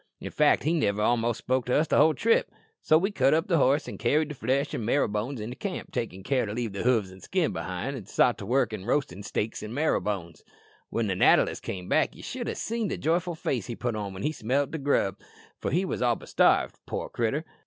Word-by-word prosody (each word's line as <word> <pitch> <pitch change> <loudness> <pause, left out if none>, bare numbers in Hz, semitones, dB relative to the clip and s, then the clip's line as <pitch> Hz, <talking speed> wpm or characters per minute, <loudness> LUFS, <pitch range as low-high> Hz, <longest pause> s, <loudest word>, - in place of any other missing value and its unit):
In - - -6
fact 150 -1 +3
he 155 - +1
niver 105 -10 +1
a'most 120 0 +1
spoke 130 -1 -1
to 125 - +2
us 155 +1 +1
all 150 - +7
the 160 - +1
trip. 230 - +2 0.4
Well, 155 - +7
we 195 +4 0
cut 135 -4 +3
up 165 +2 +1
the 170 -5 +3
horse, 140 +3 +3
an' - - -7
carried 155 +1 +2
the - - -4
flesh 130 +2 -1
an' - - -3
marrowbones 115 +1 0
into 110 +4 -5
camp, 200 +2 -5
takin' 95 -5 -4
care 125 -1 0
to 105 - -4
leave 115 -3 -3
the 100 - -3
hoofs 115 -6 +2
an' 95 - -13
skin 180 - -1
behind, 95 +10 -4
an' 110 -7 -8
sot 120 +2 +2
to 100 - -6
work 125 -2 +2
an' 100 -3 -6
roasted 110 -7 -1
steaks 110 +1 -3
an' 110 +3 -6
marrowbones." 100 - -1 0.5
"When 115 - -1
the 100 - 0
natter 90 - +5
list - - -6
came 90 -1 -6
back - - +2
ye - - -12
should - - -4
ha' - - -3
seen 230 -1 -2
the - - -3
joyful 170 +2 0
face 130 -8 -2
he 120 - -4
put 120 -1 -2
on 105 -2 -4
when 95 - -6
he 155 - +1
smelt 135 +1 -1
the 160 - -4
grub, 135 -9 +1 0.4
for - - -2
he 180 +7 +1
was - - -3
all 120 -1 +3
but - - -12
starved - - +3
out, - - -49
poor - - -3
critter." 120 +7 -1
125 Hz, 250 wpm, -27 LUFS, 105-150 Hz, 0.5 s, all